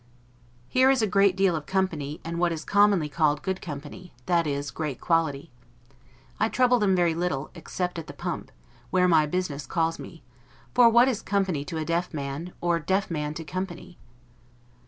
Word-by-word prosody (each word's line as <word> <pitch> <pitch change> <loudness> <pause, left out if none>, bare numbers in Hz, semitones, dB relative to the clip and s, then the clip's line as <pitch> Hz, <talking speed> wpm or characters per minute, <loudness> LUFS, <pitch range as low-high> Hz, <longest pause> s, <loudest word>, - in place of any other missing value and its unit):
Here 260 +1 +4
is 265 -4 +3
a 205 -3 -2
great 195 -1 +5
deal 190 -2 +2
of 150 -2 -5
company, 160 -6 -1
and 170 +1 -3
what 175 -1 +2
is 160 -1 -5
commonly 200 -5 +3
called 150 0 +1
good 190 -1 -2
company, 155 +4 -8
that 170 -2 +2
is, 140 -2 -2
great 150 0 -4
quality. 165 -3 0 0.9
I 220 - +2
trouble 250 0 +3
them 195 -3 +3
very 175 -2 +2
little, 170 -5 -2
except 180 +1 -4
at 160 - -8
the - - -8
pump, - - -5 0.4
where 180 +4 +3
my 160 -3 +4
business 150 -4 -3
calls 165 -2 0
me; 165 - -11 0.5
for 240 -2 +7
what 235 +2 +5
is 235 -5 -1
company 190 -9 0
to 165 - -5
a 155 - -2
deaf 170 0 -1
man, 145 +5 -5
or 175 -1 +2
a 165 - -8
deaf 190 +1 0
man 150 -1 -3
to 165 - -5
company? 180 +1 -6
170 Hz, 185 wpm, -26 LUFS, 155-190 Hz, 0.9 s, for